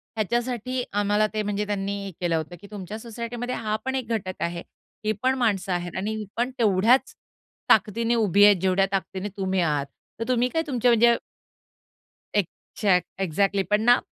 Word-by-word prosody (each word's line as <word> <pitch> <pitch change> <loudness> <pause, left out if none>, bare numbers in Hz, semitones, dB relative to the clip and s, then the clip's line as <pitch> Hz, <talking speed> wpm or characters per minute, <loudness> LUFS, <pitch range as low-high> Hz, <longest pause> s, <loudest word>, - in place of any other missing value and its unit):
ह्याच्यासाठी 240 +3 -1
आम्हाला 205 +1 +2
ते 215 - 0
म्हणजे 205 0 -1
त्यांनी 200 -1 -2
हे 195 - -6
केलं 170 -2 +1
होतं 160 +2 -3
की 200 - -11
तुमच्या 205 +1 -6
सोसायटीमध्ये 235 +2 -5
हा 215 -1 -2
पण 265 0 -1
एक 255 -4 -2
घटक 185 -4 -2
आहे, 170 0 -2 0.4
ही 215 - +2
पण 260 +1 +3
माणसं 200 -6 0
आहेत 175 -1 -3
आणि 210 +3 -2
ही 215 -1 -5
पण 245 +2 0
तेवढ्याच 220 +4 +3 0.5
ताकदीने 225 +3 +3
उभी 205 -3 +4
आहेत, 205 -1 +7
जेवढ्या 190 +1 +3
ताकदीने 195 +1 -2
तुम्ही 190 -1 0
आहात. 150 -4 +1 0.3
तर 230 - -3
तुम्ही 250 0 +2
काय 325 +3 0
तुमच्या 245 -3 +2
म्हणजे 235 +1 +5 1.2
एक्झॅक्ट 185 0 0 0.2
एक्झॅक्टली, 195 +3 +1
पण 210 +1 +3
ना 245 +2 +6
210 Hz, 170 wpm, -25 LUFS, 190-235 Hz, 1.2 s, आहेत